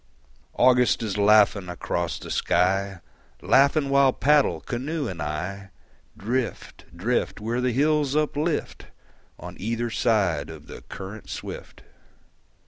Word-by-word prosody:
August 125 -1 +3
is 105 -4 -3
laughing 100 -2 +4
across 90 - -3
the - - -9
sky, 95 +1 0 0.4
Laughing 140 +2 +3
while 140 -1 +4
paddle, 145 +2 +2
canoe 140 +4 -4
and 90 -6 -6
I, 90 +7 -5 0.5
Drift, 120 +4 -4
drift, 115 +7 -1
Where 115 +3 -2
the 125 0 +1
hills 145 +2 +1
uplift 150 +1 -1 0.5
On - - -9
either 115 +3 -2
side 95 -11 +1
of 80 -2 -10
the - - -10
current 100 +3 -9
swift. - - -8
115 Hz, 120 wpm, -24 LUFS, 95-135 Hz, 0.5 s, laughing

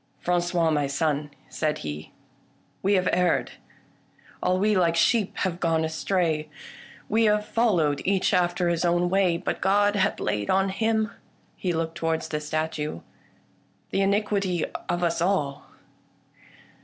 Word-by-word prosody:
" - - -41
Fran 175 0 +1
cois, 175 -2 +1
my 145 -2 +1
son," 145 +1 -1 0.2
said 155 -1 -1
he, 75 +1 -6 0.4
" - - -38
we 200 +2 +2
have 185 -1 +1
erred. 180 -2 +1 0.9
All 185 - +2
we 210 +2 +2
like 170 -3 +2
sheep 210 +4 +2
have 180 -2 -1
gone 165 -2 +1
astray; 160 -1 -1 0.6
we 225 +2 +2
have 210 0 +2
followed 175 -12 +1
each 195 +1 +1
after 175 -1 +2
his 170 0 0
own 175 0 +2
way, 190 -3 +3
but - - -3
God 205 +2 +3
hath 205 +1 +1
laid 105 -1 -2
on 195 +1 +2
Him 220 +1 0
" - - -35
— - - -36
he 180 - -2
looked 165 0 -3
towards 165 -1 -1
the 150 - -2
statue 150 - -3 0.3
— - - -35
" - - -40
the 195 - +1
iniquity 200 -3 +1 0.2
of 175 0 0
us 170 -1 0
all." 150 -7 0
175 Hz, 165 wpm, -25 LUFS, 160-195 Hz, 0.9 s, way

